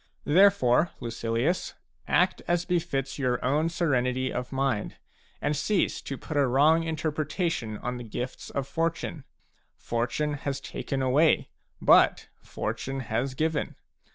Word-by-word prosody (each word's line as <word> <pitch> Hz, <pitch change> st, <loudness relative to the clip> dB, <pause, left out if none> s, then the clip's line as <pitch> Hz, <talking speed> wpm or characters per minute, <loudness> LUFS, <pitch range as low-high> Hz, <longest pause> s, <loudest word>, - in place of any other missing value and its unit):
Therefore, 170 Hz, -4 st, +5 dB
Lucilius, 115 Hz, +8 st, -1 dB, 0.3 s
act 180 Hz, +1 st, +2 dB
as 175 Hz, 0 st, +1 dB
befits 160 Hz, -7 st, -1 dB
your 125 Hz, -2 st, +1 dB
own 150 Hz, +5 st, +2 dB
serenity 130 Hz, -6 st, 0 dB
of 125 Hz, 0 st, -4 dB
mind, 135 Hz, -5 st, -1 dB, 0.4 s
and 150 Hz, -, 0 dB
cease 165 Hz, +7 st, 0 dB
to 135 Hz, -, -5 dB
put 155 Hz, -, -7 dB
a 140 Hz, -2 st, +4 dB
wrong 150 Hz, +6 st, +4 dB
interpre 160 Hz, -1 st, -2 dB
tation 150 Hz, -, -2 dB
on 125 Hz, 0 st, -2 dB
the 120 Hz, -, -7 dB
gifts 120 Hz, +3 st, -6 dB
of 135 Hz, -1 st, -3 dB
Fortune. 165 Hz, -1 st, -2 dB, 0.5 s
Fortune 120 Hz, +6 st, -2 dB
has 140 Hz, -1 st, -2 dB
taken 135 Hz, -1 st, -4 dB
away, 145 Hz, +5 st, +3 dB, 0.3 s
but -, -, +5 dB
Fortune 135 Hz, 0 st, -4 dB
has 130 Hz, +4 st, 0 dB
given. 160 Hz, +1 st, -1 dB
140 Hz, 130 wpm, -27 LUFS, 125-160 Hz, 0.5 s, Therefore